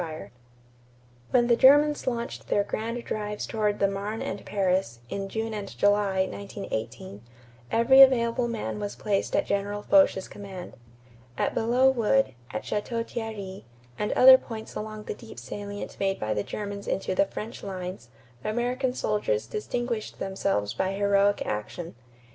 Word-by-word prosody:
_ - - -1
TROOPS 165 - -5
RETURNING 155 - -8
FROM - - -30
FRANCE] 120 0 -30
When 240 -1 +4
the 235 - +5
Germans 290 +4 +5
launched 235 -1 -3
their 205 - +2
grand 230 +3 -4
drives 210 -1 -3
toward 210 -2 0
the 200 - +3
Marne 200 +3 -3
and - - -4
Paris, 185 - 0
in 195 0 -4
June 225 +2 -3
and 205 -2 -6
July, 200 -2 +3
1918, 115 - -6 0.5
every 260 +4 +6
available 240 -2 +5
man 225 -2 -3
was 205 -1 -4
placed 205 -2 -1
at - - +2
General 205 +1 -2
Foch's 285 -10 +4
command. 195 -3 -9 0.6
At - - 0
Belleau 250 +4 +3
Wood, 265 - +2 0.2
at 110 - -4
Château 230 +2 -2
Thierry, 210 -5 -6 0.4
and 210 - 0
other 260 0 +9
points 220 -2 -8
along 215 0 -6
the - - -4
deep 225 +2 -12
salient 205 0 -7
made 195 -1 0
by 110 0 -1
the 105 - -1
Germans 200 - -5
into 190 - -1
the 190 - +3
French 220 +4 -7
lines, 185 -10 -6 0.3
American 250 +3 -1
soldiers 205 - 0
distinguished 230 - -3
themselves 190 - -1
by 190 0 -1
heroic 200 0 +2
action. 105 +11 -4
205 Hz, 160 wpm, -27 LUFS, 190-230 Hz, 0.6 s, other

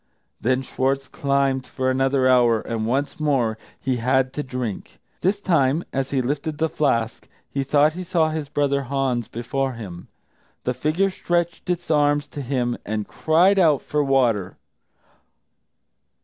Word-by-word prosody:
Then 130 +3 +1
Schwartz 135 +1 -1
climbed 140 -2 0
for 130 -1 -1
another 135 0 +2
hour, 120 -3 +4
and 110 0 -3
once 140 +7 -1
more 135 -7 +1 0.2
he 130 -2 -1
had 130 +2 +1
to 150 - -2
drink. 125 - -5 0.2
This 200 +3 +1
time, 160 -5 +2
as 135 0 -1
he 135 -2 0
lifted 145 +4 -2
the 160 +1 +1
flask, 115 -7 0 0.2
he 140 - -1
thought 145 +3 +3
he 180 +2 -5
saw 170 -3 +1
his 155 -3 -4
brother 140 -1 +1
Hans 130 -3 -1
before 130 +3 -2
him. 95 -7 -9 0.6
The 125 - 0
figure 165 +9 0
stretched 175 -1 -2
its 175 -2 -1
arms 145 -1 +2
to 145 - -6
him, 125 -2 -1
and 105 0 -3
cried 180 +5 +3
out 155 -6 +4
for 150 -1 0
water. 120 -9 +1
135 Hz, 150 wpm, -23 LUFS, 125-150 Hz, 0.6 s, hour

